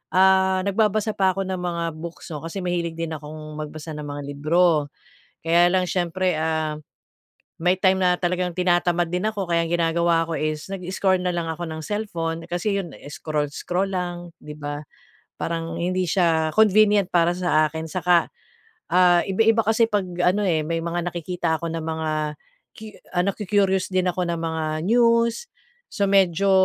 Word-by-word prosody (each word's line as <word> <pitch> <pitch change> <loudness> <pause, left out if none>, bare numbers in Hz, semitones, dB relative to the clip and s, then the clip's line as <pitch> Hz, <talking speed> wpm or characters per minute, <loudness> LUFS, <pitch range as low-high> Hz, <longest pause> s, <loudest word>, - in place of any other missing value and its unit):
ah, 190 0 +4
nagbabasa 215 +2 +1
pa 190 -1 +3
ko 195 - -1
ng 190 -1 -3
mga 175 -1 -2 0.2
books 170 0 -8
'no, 150 - -4
kasi 165 +4 -5
mahilig 170 -2 -2
din 165 -1 -4
akong 155 0 -9
magbasa 155 +1 -7
ng 150 - -6
mga 145 0 -5
libro. 155 +1 +2 0.6
Kaya 170 +2 +4
lang 185 0 +2
siyempre, 180 0 0
ah, 155 -1 -1 0.8
may 180 +3 +3
time 190 0 +2
na 180 -1 +3
talagang 180 0 -1
tinatamad 175 -1 +1
din 180 +4 0
ako, 210 -2 -2
kaya 170 0 +2
ang - - -7
ginagawa 170 0 +2
ko 165 - -7
is 155 +4 -3
nag 195 - -4
i-scroll 190 0 +1
na 180 -1 -1
lang 165 -1 -2
ako 170 +2 -5
ng 160 0 -6
cellphone, 165 -4 -3
kasi 200 +4 -1
yun 170 -7 -7 0.2
scroll-scroll 155 +6 -2
lang 175 -2 -4
di 150 0 -9
ba, 145 -1 -5 0.6
parang 165 0 -3
hindi 185 +1 0
siya 160 -3 +1
convenient 210 -2 +4
para 175 -1 +3
sa 175 -4 +2
akin, 160 +1 -6
saka, 180 0 +2 0.6
ah, 175 -1 +5
iba-iba 225 +3 +2
kasi 225 +1 +3
pag 205 -3 0 0.2
ano, 200 +4 +2
eh, 165 -5 +1
may 165 0 -2
mga 170 +1 -2
nakikita 175 -1 -2
ako 165 +1 -4
na 165 - -3
mga 155 -1 -2 0.4
cu 220 - -10 0.3
ano 180 +2 +2
ku-curious 195 -1 +1
din 185 -1 +1
ako 180 0 -2
na 170 - -1
mga 160 -1 -2
news, 235 - +2 0.4
so 200 - -2
medyo 195 -1 +3
175 Hz, 170 wpm, -23 LUFS, 160-190 Hz, 0.8 s, ah